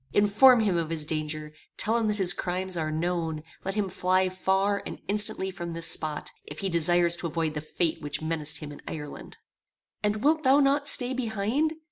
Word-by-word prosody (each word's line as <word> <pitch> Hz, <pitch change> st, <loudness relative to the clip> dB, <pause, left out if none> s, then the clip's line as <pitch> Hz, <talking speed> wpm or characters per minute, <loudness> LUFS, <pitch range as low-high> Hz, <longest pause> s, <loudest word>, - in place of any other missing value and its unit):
Inform 220 Hz, +5 st, +6 dB
him 200 Hz, -5 st, +1 dB
of 165 Hz, -2 st, -2 dB
his 160 Hz, -2 st, -4 dB
danger; 155 Hz, 0 st, -4 dB, 0.2 s
tell 225 Hz, -, +2 dB
him 230 Hz, -2 st, +1 dB
that 210 Hz, 0 st, 0 dB
his 185 Hz, -3 st, +3 dB
crimes 185 Hz, +1 st, -2 dB
are 160 Hz, -2 st, -2 dB
known; 160 Hz, -1 st, -2 dB, 0.2 s
let 195 Hz, +1 st, -3 dB
him 210 Hz, -2 st, 0 dB
fly 185 Hz, 0 st, +1 dB
far 190 Hz, +2 st, 0 dB
and -, -, -7 dB
instantly 200 Hz, -1 st, 0 dB
from 175 Hz, -2 st, -6 dB
this 165 Hz, 0 st, -4 dB
spot, 155 Hz, -2 st, -2 dB
if 145 Hz, -, -10 dB
he 195 Hz, -, -2 dB
desires 170 Hz, 0 st, +2 dB
to 175 Hz, -, -2 dB
avoid 160 Hz, -1 st, -2 dB
the 150 Hz, -, -4 dB
fate 160 Hz, +1 st, -2 dB
which 145 Hz, 0 st, -3 dB
menaced 155 Hz, -1 st, +1 dB
him 150 Hz, -1 st, -7 dB
in 145 Hz, -, -11 dB
Ireland. 150 Hz, -2 st, -8 dB, 0.6 s
"And 210 Hz, +1 st, -1 dB
wilt 310 Hz, +2 st, +3 dB
thou 270 Hz, 0 st, +5 dB
not 285 Hz, +1 st, +2 dB
stay 255 Hz, -2 st, +5 dB
behind? 245 Hz, +5 st, -1 dB
180 Hz, 195 wpm, -27 LUFS, 160-210 Hz, 0.6 s, Inform